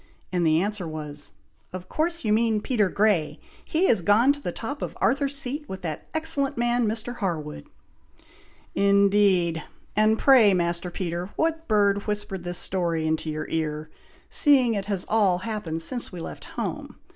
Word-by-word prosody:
and 175 -1 +1
the 160 -1 +3
answer 200 -1 -2
was, 150 -2 -7 0.4
'Of 185 0 -7
course 335 - -2
your 210 - +3
mean 220 -1 +2
Peter 210 -3 +1
Grey! 175 -8 +1 0.3
He 330 +4 +1
is 220 - +3
gone 220 +10 +4
to 285 - -11
the 175 - -3
top 270 +10 -6
of - - -5
Arthur's 280 0 +1
Seat 285 +3 -3
with 190 -1 -7
that 155 -3 -5
excellent 315 -5 -1
man, 240 -1 +1
Mr. 225 +3 -2
Harwood!'" 155 - -4 1.1
"Indeed! 200 -4 +3 0.3
and 215 +1 +3
pray, 230 -8 +6
Master 170 0 -1
Peter, 175 0 -4
what 325 0 -1
bird 200 -2 +2
whispered 205 -3 -3
this 175 0 -3
story 170 -4 +1
into 160 0 -1
your 155 0 -3
ear, 155 -1 -3 0.4
seeing 265 -6 +4
it 200 -2 -2
has 200 -3 -1
all 205 -5 +3
happened 180 -5 -3
since 245 +6 -3
we 180 - -8
left - - -8
home! - - -5
200 Hz, 165 wpm, -25 LUFS, 170-235 Hz, 1.1 s, pray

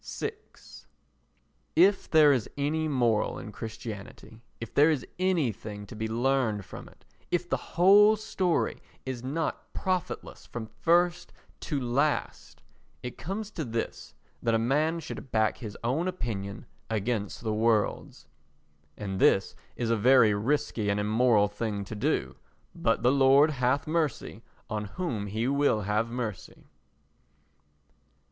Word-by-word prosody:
vi 435 - -1 1.4
If 190 +4 +4
there 150 -3 +6
is 125 -5 -1
any 155 +3 0
moral 120 -7 +1
in 110 - -8
Christianity, 110 0 -8 0.2
if 115 - -7
there 150 +3 +5
is 150 -5 0
anything 120 - -1
to 100 - -11
be 110 +1 -3
learned 115 -3 0
from - - -10
it, - - -24 0.2
if 175 0 0
the - - -4
whole 205 +4 +7
story 190 -5 -1 0.2
is 130 -2 -5
not 155 +5 -3
profitless 185 -2 -3
from 120 -2 -6
first 175 +1 +2 0.3
to 145 - -2
last, 135 +4 -1 0.4
it 125 - -7
comes 200 +5 -4
to 165 - -4
this 115 -3 -5 0.3
that 115 -1 +1
a - - +4
man 150 +8 +1
should 135 - -8
back 110 -2 +1
his 105 -4 -7
own 140 +10 0
opinion 105 - -4 0.2
against 110 -1 -2
the 110 -2 -1
world's—and 100 -5 -3
this 95 - +3 0.2
is 115 -2 -1
a - - +4
very 115 -1 +5
risky 110 -1 0
and 100 +1 +1
immoral 110 0 +3
thing 105 -1 -4
to - - -8
do, 65 - -1 0.4
but 115 +1 0
the 125 - +5
Lord 140 +2 +5
hath 130 +1 0
mercy 155 -9 -2 0.3
on 105 -2 -3
whom 115 - -4
he 110 +4 -2
will 140 -5 +2
have 105 +3 0
mercy. 115 -6 -5
120 Hz, 135 wpm, -28 LUFS, 110-150 Hz, 1.4 s, whole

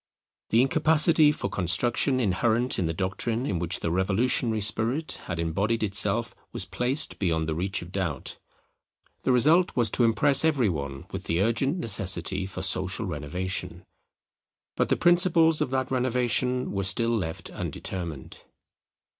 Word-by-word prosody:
The 115 +3 +4
incapacity 155 +2 +4
for 150 - -4
construction 120 - +1
inherent 115 +3 0
in 90 - 0
the - - -1
doctrine 100 +7 -2
in 95 -10 -2
which 85 0 -1
the 85 - -2
revolutionary 110 +5 +1
spirit 115 +9 -1
had 95 - -4
embodied 100 +8 -1
itself 105 +3 +1 0.2
was - - -2
placed 130 +5 -2
beyond 80 -4 0
the 80 - -1
reach 95 +3 -3
of 85 - -12
doubt. 90 -8 -4 0.8
The - - 0
result 155 +9 +3
was 120 -4 +1
to 125 - +1
impress 120 +6 +4
every 140 -9 +2
one 70 -4 -5
with - - -6
the 85 - -1
urgent 135 - 0
necessity 95 - -1
for 95 -1 -6
social 95 +3 -1
renovation; 90 +2 -4 0.9
but - - 0
the - - +2
principles 170 -2 +3
of - - 0
that 130 0 -2
renovation 125 0 0
were 100 - -2
still 115 +5 +2
left 80 -7 -4
undetermined. 85 -8 -6
110 Hz, 145 wpm, -26 LUFS, 90-130 Hz, 0.9 s, The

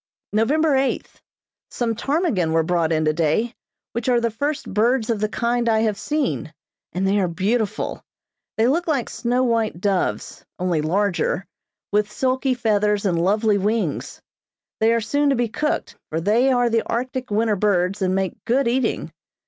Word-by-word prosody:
November 285 +8 +3
eighth: 265 0 -1 0.5
Some 235 -2 -1
ptarmigan 235 - 0
were 165 0 +3
brought 165 -1 +1
in 155 -1 +1
today, 160 +9 +1 0.4
which 235 +2 -2
are 245 -1 +4
the 235 -1 0
first 285 +4 -3
birds 230 +2 +2
of 220 - -1
the 215 0 0
kind 235 +1 0
I 220 -1 +3
have 215 -2 +1
seen, 285 - -2 0.4
and 190 +2 -1
they 200 +1 +2
are 185 - +2
beautiful. 205 +5 -1 0.6
They 220 - +3
look 330 +8 +1
like 280 -7 0
snow 245 +2 0
white 230 -6 0
doves, 195 -1 -1
only 175 -4 0
larger, 190 +3 0 0.5
with 210 0 +1
silky 260 +2 0
feathers 210 -3 +1
and 170 -4 +1
lovely 210 +3 +2
wings. 215 +3 -1 0.6
They 220 +1 +4
are 230 0 +2
soon 285 +6 +1
to 275 - +3
be 240 -1 +1
cooked, 300 +7 -2
for 160 - -1
they 225 +9 +3
are 245 -1 +3
the 230 0 +3
Arctic 255 +2 -3
winter 215 +1 +1
birds 195 -1 +1
and 185 0 +1
make 190 -1 -2
good 255 +2 +2
eating. 240 0 0
220 Hz, 165 wpm, -22 LUFS, 195-245 Hz, 0.6 s, are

